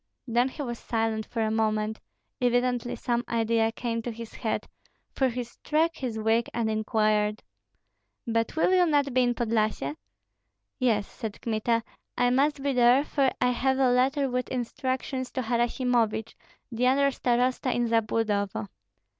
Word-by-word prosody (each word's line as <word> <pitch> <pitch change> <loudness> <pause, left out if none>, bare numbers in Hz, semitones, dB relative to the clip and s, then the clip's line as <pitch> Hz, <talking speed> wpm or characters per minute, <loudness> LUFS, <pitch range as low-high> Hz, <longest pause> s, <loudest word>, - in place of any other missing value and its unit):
Then 240 +1 +2
he 290 - -6
was 240 -3 -5
silent 225 -1 -1
for 230 -2 -2
a 215 - 0
moment; 215 0 0 0.4
evidently 245 0 +1
some 240 -1 -1
idea 225 -1 +1
came 230 0 -3
to 240 - -4
his 230 0 -9
head, 220 - -3 0.4
for 265 -1 +1
he 245 +1 -3
struck 310 +7 -1
his 245 -4 -4
wig 225 +2 +1
and 225 -2 0
inquired, 215 -1 +1 0.8
"But 230 +1 -1
will 325 +3 +3
you 360 -1 +5
not 285 -3 +2
be 255 - +4
in 245 -1 +2
Podlyasye?" 225 +3 0 0.8
"Yes," 225 -6 +2
said 220 -4 -7
Kmita, 230 0 0 0.3
"I 245 0 +3
must 275 +2 +2
be 280 -1 +1
there, 250 +2 +5
for 275 -3 +1
I 250 0 +3
have 265 +2 +1
a 260 -2 +3
letter 270 +3 +2
with 250 0 -2
instructions 260 +1 -3
to 260 - -2
Harasimovich, 235 -2 0 0.4
the 240 +2 +1
under 275 +2 +3
starosta 250 +1 +1
in 240 0 +1
Zabludovo." 215 -3 0
240 Hz, 155 wpm, -27 LUFS, 225-255 Hz, 0.8 s, you